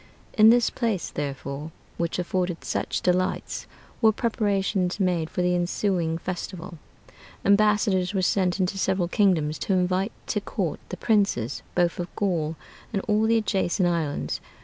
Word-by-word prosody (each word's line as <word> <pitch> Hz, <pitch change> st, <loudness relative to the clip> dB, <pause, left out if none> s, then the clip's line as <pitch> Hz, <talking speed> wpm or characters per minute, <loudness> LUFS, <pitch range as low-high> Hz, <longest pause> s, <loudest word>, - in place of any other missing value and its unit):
In 215 Hz, -1 st, +7 dB
this 240 Hz, 0 st, +4 dB
place, 225 Hz, -7 st, -1 dB
therefore, 140 Hz, +1 st, -4 dB, 0.3 s
which 170 Hz, 0 st, -1 dB
afforded 180 Hz, -1 st, -2 dB
such -, -, -2 dB
delights, 180 Hz, 0 st, 0 dB, 0.3 s
were 220 Hz, -2 st, +6 dB
preparations 200 Hz, -5 st, 0 dB
made 175 Hz, -4 st, +1 dB
for 180 Hz, -, -1 dB
the 180 Hz, 0 st, +2 dB
ensuing 175 Hz, -1 st, 0 dB
festival. 180 Hz, -1 st, -6 dB, 0.7 s
Ambassadors 200 Hz, -2 st, +3 dB
were 190 Hz, -2 st, 0 dB
sent 185 Hz, 0 st, +1 dB
into 190 Hz, +1 st, 0 dB
several 185 Hz, -2 st, +1 dB
kingdoms 170 Hz, -6 st, +2 dB
to 195 Hz, -, 0 dB
invite 185 Hz, +3 st, +1 dB
to -, -, -1 dB
court -, -, -3 dB
the -, -, -5 dB
princes 200 Hz, -, +1 dB
both 175 Hz, -1 st, +1 dB
of 175 Hz, -, -2 dB
Gaul 165 Hz, -6 st, 0 dB, 0.4 s
and 200 Hz, -4 st, -1 dB
all 215 Hz, 0 st, +3 dB
the 230 Hz, 0 st, +4 dB
adjacent 190 Hz, -4 st, +1 dB
islands 165 Hz, -4 st, -1 dB
185 Hz, 145 wpm, -25 LUFS, 175-205 Hz, 0.7 s, In